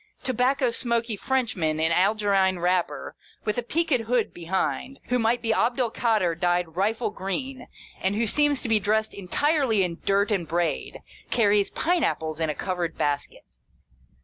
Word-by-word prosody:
To 255 Hz, -, 0 dB
bacco 255 Hz, +1 st, +2 dB
smoky 235 Hz, -1 st, -1 dB
Frenchman 200 Hz, -, -1 dB
in 160 Hz, +1 st, +2 dB
Algerine 195 Hz, 0 st, +2 dB
wrapper, 180 Hz, 0 st, -1 dB, 0.3 s
with 230 Hz, +3 st, -2 dB
peaked 320 Hz, -6 st, +1 dB
hood 245 Hz, -2 st, +1 dB
behind, 175 Hz, -, -2 dB
who 250 Hz, 0 st, +2 dB
might 235 Hz, +1 st, +1 dB
be 225 Hz, -1 st, +2 dB
Abd 240 Hz, +3 st, +1 dB
el 240 Hz, -3 st, +1 dB
Kader 215 Hz, -9 st, +1 dB
dyed 175 Hz, -1 st, 0 dB
rifle 215 Hz, +4 st, 0 dB
green, 245 Hz, +7 st, -4 dB, 0.3 s
and 190 Hz, +2 st, 0 dB
who 230 Hz, +2 st, +1 dB
seems 290 Hz, +4 st, +2 dB
to -, -, -3 dB
be 225 Hz, -1 st, +3 dB
dressed 215 Hz, +2 st, 0 dB
entirely 230 Hz, -, +1 dB
in 170 Hz, -1 st, -3 dB
dirt 200 Hz, +2 st, +2 dB
and 185 Hz, -5 st, 0 dB
braid, 170 Hz, +1 st, -2 dB, 0.3 s
carries 205 Hz, -3 st, +3 dB
pine 350 Hz, 0 st, 0 dB
apples 155 Hz, 0 st, -1 dB
in 160 Hz, -1 st, 0 dB
a 150 Hz, -, -2 dB
covered 175 Hz, -3 st, -3 dB
basket. 145 Hz, -1 st, -2 dB
210 Hz, 160 wpm, -25 LUFS, 180-245 Hz, 0.3 s, be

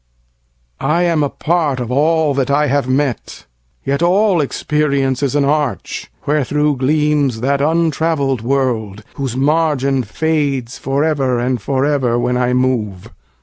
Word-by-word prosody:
I 155 Hz, +5 st, +1 dB
am 165 Hz, -3 st, +1 dB
a 145 Hz, -, +1 dB
part 155 Hz, -5 st, -1 dB
of 120 Hz, -1 st, -4 dB
all 155 Hz, +2 st, +2 dB
that 135 Hz, 0 st, -1 dB
I 145 Hz, +2 st, +2 dB
have 140 Hz, -2 st, 0 dB
met; 130 Hz, -3 st, -2 dB, 0.4 s
Yet 140 Hz, +3 st, -1 dB
all 185 Hz, 0 st, +3 dB
experience 140 Hz, -2 st, -1 dB
is 140 Hz, 0 st, -1 dB
an 145 Hz, -1 st, +2 dB
arch 150 Hz, +1 st, -2 dB, 0.2 s
wherethro'Gleams 150 Hz, -2 st, +1 dB
that 140 Hz, +2 st, +1 dB
untravell'd 160 Hz, -4 st, 0 dB
world, 115 Hz, -5 st, -1 dB
whose 130 Hz, -3 st, -4 dB
margin 140 Hz, -2 st, +1 dB
fadesFor 140 Hz, +1 st, -1 dB
ever 135 Hz, -6 st, 0 dB
and 125 Hz, -1 st, -1 dB
for 135 Hz, +4 st, 0 dB
ever 130 Hz, -5 st, +1 dB
when 125 Hz, +1 st, 0 dB
I 125 Hz, 0 st, +1 dB
move. 120 Hz, -7 st, -1 dB
140 Hz, 135 wpm, -17 LUFS, 130-150 Hz, 0.4 s, all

